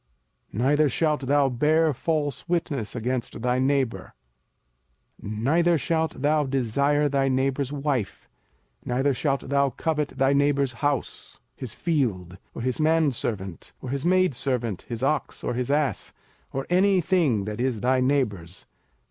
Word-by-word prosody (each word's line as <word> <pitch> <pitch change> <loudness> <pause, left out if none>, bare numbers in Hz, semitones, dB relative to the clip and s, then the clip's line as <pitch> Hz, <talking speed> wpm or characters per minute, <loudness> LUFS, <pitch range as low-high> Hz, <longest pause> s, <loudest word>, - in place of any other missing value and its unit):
05:005:020 115 - -2
Neither 145 +2 +3
shalt 150 +3 +1
thou 140 0 +4
bear 150 +5 +2
false 150 +3 -2
witness 145 -11 -1
against 120 0 -3
thy 125 0 +1
neighbour. 135 -2 0 1.1
05:005:021 105 +1 -5
Neither 170 +5 +3
shalt 160 0 -1
thou 150 +1 +3
desire 140 +3 +1
thy 135 -1 +1
neighbour's 135 +1 0
wife, 140 -7 -2 0.6
neither 135 +3 +1
shalt 135 0 -1
thou 140 0 +3
covet 150 +1 -1
thy 135 0 +3
neighbour's 140 -2 +2
house, 145 -3 -2 0.2
his 125 -5 -7
field, 100 - -1 0.2
or 115 - -5
his 130 +3 -1
manservant, 130 - -1
or 130 - -7
his 140 0 -2
maidservant, 135 - 0
his 120 0 -4
ox, 145 0 -1
or - - -1
his 125 +1 -2
ass, 145 -1 0 0.4
or 135 0 -3
any 190 +1 +4
thing 155 - +1
that 105 +2 -4
is 125 -5 -1
thy 130 +1 +2
neighbour's. 105 - -1
135 Hz, 140 wpm, -25 LUFS, 125-150 Hz, 1.1 s, thou